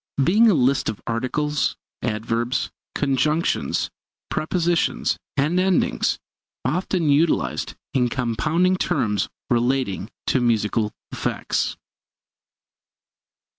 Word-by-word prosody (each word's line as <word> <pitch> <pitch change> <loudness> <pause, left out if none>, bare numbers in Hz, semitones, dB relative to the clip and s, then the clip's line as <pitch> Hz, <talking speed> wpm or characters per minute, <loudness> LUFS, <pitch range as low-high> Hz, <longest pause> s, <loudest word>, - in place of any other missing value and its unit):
Being 215 - +5
a 200 - +4
list 135 -1 +2
of 110 - -4
articles, 140 +6 0 0.2
adverbs, 115 +3 -1 0.2
conjunctions, 145 +4 +1 0.4
prepositions, 170 +1 +1 0.2
and 150 +6 +2
endings, 185 -1 +2 0.5
often 170 +3 0
utilized 155 +3 +2 0.2
in 125 -2 +2
compounding 155 +10 +1
terms 105 - 0 0.2
relating 120 -5 +1 0.2
to 130 - +2
musical 110 -2 +1 0.2
effects. - - -1
135 Hz, 85 wpm, -23 LUFS, 115-165 Hz, 0.5 s, Being